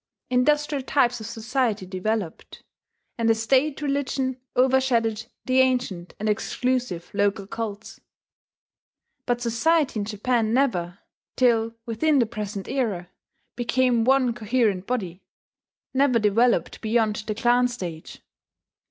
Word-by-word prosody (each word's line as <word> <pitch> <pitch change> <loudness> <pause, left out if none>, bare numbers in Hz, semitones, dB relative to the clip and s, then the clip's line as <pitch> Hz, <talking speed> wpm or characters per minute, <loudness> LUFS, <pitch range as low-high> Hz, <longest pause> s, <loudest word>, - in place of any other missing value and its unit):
Industrial 295 +3 +2
types 245 -3 +2
of 220 - -7
society 230 -2 -1
developed; 190 -1 -4 0.6
and 230 0 +2
a 225 - +5
state 270 +6 +1
religion 275 -2 -1 0.2
overshadowed 250 -4 +2 0.2
the 260 0 +2
ancient 245 -9 0
and 215 - -2
exclusive 220 -3 -1
local 200 0 0
cults. 220 0 -6 1.3
But 245 0 0
society 255 +3 +1
in 205 - -2
Japan 225 +2 0
never, 180 -10 0 0.4
till 230 -2 +2
within 280 +7 +1
the 245 - +4
present 210 -3 -5
era, 200 -10 -2 0.4
became 240 0 +2
one 260 -1 +3
coherent 220 -4 0
body, 190 -7 -3 0.7
never 265 -2 +3
developed 230 +3 +2
beyond 220 -1 +1
the 215 - -2
clan 245 +2 +3
stage. 180 -10 -7
235 Hz, 115 wpm, -24 LUFS, 210-255 Hz, 1.3 s, a